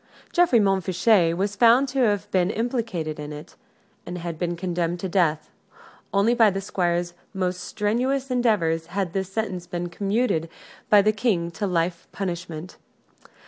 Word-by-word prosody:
Geoffrey 345 -9 +4
Montfichet 190 -2 +3
was 200 +2 -1
found 240 +5 +5
to 270 +1 -2
have 210 -5 +1
been 185 -1 +2
implicated 220 - -2
in 150 0 -6
it, 150 +2 -10 0.5
and 180 - -6
had 170 -2 -5
been 175 -1 -1
condemned 175 -1 -2
to 190 - -2
death. 170 -4 +1 0.6
Only 200 +4 +3
by 230 -3 +5
the 195 0 -2
Squire's 175 -2 -1 0.2
most 180 -1 -1
strenuous 255 +8 -1
endeavors 200 -10 +1
had 180 -1 -3
this 190 -1 -2
sentence 185 -5 -3
been 175 0 -4
commuted 195 -2 0 0.4
by 205 -1 +7
the 215 +1 +3
King 195 -6 0
to 200 +5 -3
life 170 -1 -1
punishment. 175 -3 -5
185 Hz, 150 wpm, -24 LUFS, 170-215 Hz, 0.6 s, by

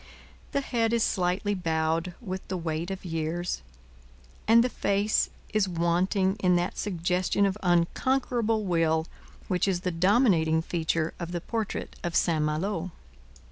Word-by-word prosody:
The 280 - 0
head 230 -4 0
is 230 -1 +3
slightly 185 +2 0
bowed 165 -1 -1
with 190 -5 -6
the 185 - -2
weight 165 0 -3
of 190 -1 -6
years, 165 +1 -2 0.9
and 230 +1 +7
the - - +2
face 205 -3 +1 0.2
is 210 -3 +2
wanting 185 +3 +1
in 180 -2 +3
that 175 +1 0
suggestion 180 +1 0
of 195 -1 0
unconquerable 220 +5 +1
will 165 -3 +2 0.4
which 180 +1 +1
is 180 -2 0
the 180 -1 -1
dominating 170 -3 +3
feature 165 -1 -1
of 170 0 -5
the 175 - -1
portrait 225 +1 -4
of 170 -1 -3
St 160 -3 +2
Malo. 165 +4 -1
180 Hz, 140 wpm, -27 LUFS, 165-205 Hz, 0.9 s, and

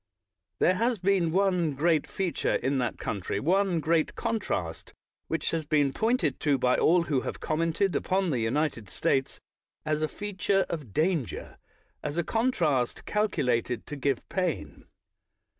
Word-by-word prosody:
There 185 - +4
has 230 +5 +1
been 185 -3 +2
one 180 -5 +2
great 155 +1 +2
feature 190 -3 -1
in 135 0 0
that 120 - -1
country', 100 0 -3
one 185 - +2
great 160 0 +1
contrast, 90 - -3 0.3
which - - -1
has 165 -1 -1
been 145 -3 +2
pointed 220 - +1
to 145 -3 +2
by 125 -1 +2
all 175 +1 +4
who 145 -6 0
have - - -5
commented 165 +4 0
upon 190 -2 +1
the 130 - 0
United 115 -2 -1
States 135 +6 0 0.5
as 155 0 0
a 155 - +2
feature 195 0 0
of 150 -10 -5
danger, 155 - -1 0.4
as 150 +2 -4
a 170 - +2
contrast 165 - 0
cal 210 0 +1
culated 125 - -1
to 150 - -6
give 140 -2 -1
pain. 165 - -3
160 Hz, 150 wpm, -28 LUFS, 135-185 Hz, 0.5 s, There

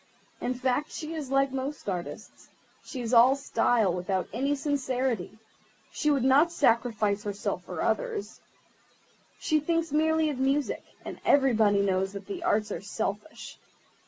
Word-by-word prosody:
In 255 - -2
fact, 260 +3 0
she 315 0 -6
is 300 -5 -5
like 275 0 +2
most 270 +1 -5
artists; 180 -3 -6 0.3
she 260 - -6
is 235 +1 -3
all 245 +3 +7
style, 240 -7 +1
without 180 +1 -2
any 275 +5 0
sincerity. 260 - -2 0.5
She 300 - 0
would 280 -4 +2
not 280 +6 +5
sacrifice 225 -8 +1
herself 205 -1 -4
for - - -4
others. 465 -5 -2 1.0
She 310 -1 +1
thinks 330 +1 -1
merely 315 +1 +2
of 265 - -6
music, 275 +2 0 0.2
and - - -7
everybody 220 -7 +4
knows 190 0 0
that 200 0 -7
the 380 -3 -6
arts 220 -12 +1
are - - -4
selfish. 205 +7 -5
260 Hz, 145 wpm, -28 LUFS, 210-295 Hz, 1.0 s, all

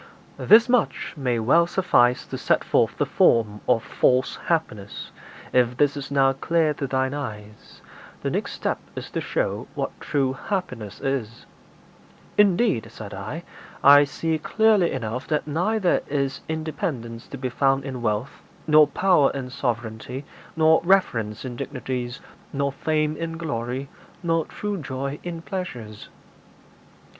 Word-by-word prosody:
IX. - - -6
'This 230 +3 +8
much 245 -2 +1
may 125 -5 0
well 140 +10 +4
suffice 125 -10 +3
to - - -6
set - - +1
forth - - +1
the - - +1
form 105 -3 +3
of 115 - +3
false 130 +1 +2
happiness; 110 - -2 0.4
if 125 -1 +3
this 145 0 +3
is 140 -1 -6
now 135 -1 +3
clear 155 +3 +1
to 140 -1 -4
thine 130 0 0
eyes, 105 -7 -8 0.4
the - - -1
next - - -2
step - - -2 0.2
is - - -7
to - - -2
show - - -2
what - - -2
true 135 -3 0
happiness 125 - -4
is.' 130 -5 -3 0.9
'Indeed,' 200 - +3
said 110 -3 -9
I, 110 - -6 0.4
'I 145 +1 +8
see 160 +3 -2
clearly 215 -1 +3
enough 125 0 -4
that 150 -2 0
neither 180 +6 +1
is 140 -2 -1
independence 145 -7 -4
to 140 - -7
be 130 -1 -3
found 135 +1 +1
in 130 -3 -5
wealth, 110 +4 -2 0.2
nor 155 -1 +6
power 165 -1 +3
in 130 -2 -5
sovereignty, 120 +2 -3 0.3
nor 160 0 +5
reverence 120 - +1
in 125 -2 -5
dignities, 125 -2 -4 0.3
nor 140 0 0
fame 155 +2 0
in 165 0 -4
glory, 130 -4 -3 0.4
nor 165 -1 +1
true 205 -2 -4
joy 135 +1 -4
in 170 -2 -6
pleasures.' 125 - -6
140 Hz, 145 wpm, -24 LUFS, 120-160 Hz, 0.9 s, This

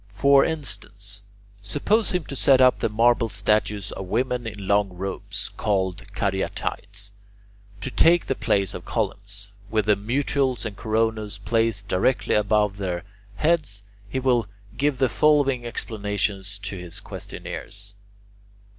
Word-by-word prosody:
For 135 +7 +5
instance, 100 -9 -1 0.4
suppose 175 - +1
him 180 -2 0
to 140 - -6
set 135 0 +5
up 130 -1 +5
the - - +1
marble 115 +2 +3
statues 105 0 0
of 95 - -6
women 125 +3 0
in 105 -3 -6
long 100 0 +3
robes, 95 +2 -4
called 95 -4 0
Caryatides, 100 +1 -3 0.7
to 135 - -4
take 170 +5 +5
the - - 0
place 100 -7 0
of - - -7
columns, 100 0 -3 0.2
with 110 -2 +1
the 105 - +4
mutules 130 +4 0
and 105 -3 -4
coronas 110 -1 -1
placed 115 -3 0
directly 100 +7 +1
above 105 -1 +2
their 90 -3 -3 0.3
heads, 150 -8 +1 0.3
he 130 - -3
will 125 -5 +2 0.3
give 145 -1 +1
the 130 - +3
following 135 0 +3
explanation 105 -3 -1 0.2
to 100 - -4
his 90 -1 -6
questioners. 100 0 -7
105 Hz, 135 wpm, -24 LUFS, 100-125 Hz, 0.7 s, For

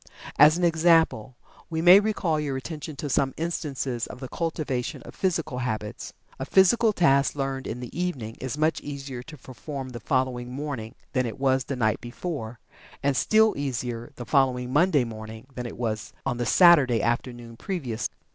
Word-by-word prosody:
As 150 +3 +8
an 180 - -2
example, 165 -8 +3 0.3
we 160 -1 -2
may 180 +4 +8
call 165 -7 0
your 140 -3 -2
attention 155 +2 -6
to 145 - -5
some 135 -1 +1
instances 140 -7 -3
of - - -10
the 130 - -6
cultivation 150 -6 -3
of - - -11
physical 165 -8 -1
habits. 110 -4 -4 0.3
A - - -2
physical 220 +4 +4
task 140 -9 +3
learned 135 -1 -3
in 120 +2 -5
the 125 - -8
evening 140 -11 -3
is 130 +2 -4
much 155 +1 +1
easier 140 -3 -6
to 155 +4 -11
perform 135 +1 -7
the 120 -2 -7
following 125 0 -1
morning 130 -5 -5 0.2
than 130 -2 +1
it 115 - -6
was 130 -1 +2
the 140 - -3
night 110 -3 0
before, 120 -2 -5 0.5
and 140 -1 +2
still 215 +11 +4
easier 120 -4 -4
the 120 - -7
following 130 -2 +1
Monday 150 -2 +4
morning 110 0 -8
than 125 -1 -5
it - - -9
was 110 -3 -3
on 130 -3 -1
the 120 - -2
Saturday 145 - +6
afternoon 120 0 -2
previous. 125 - -3
135 Hz, 175 wpm, -26 LUFS, 120-155 Hz, 0.5 s, As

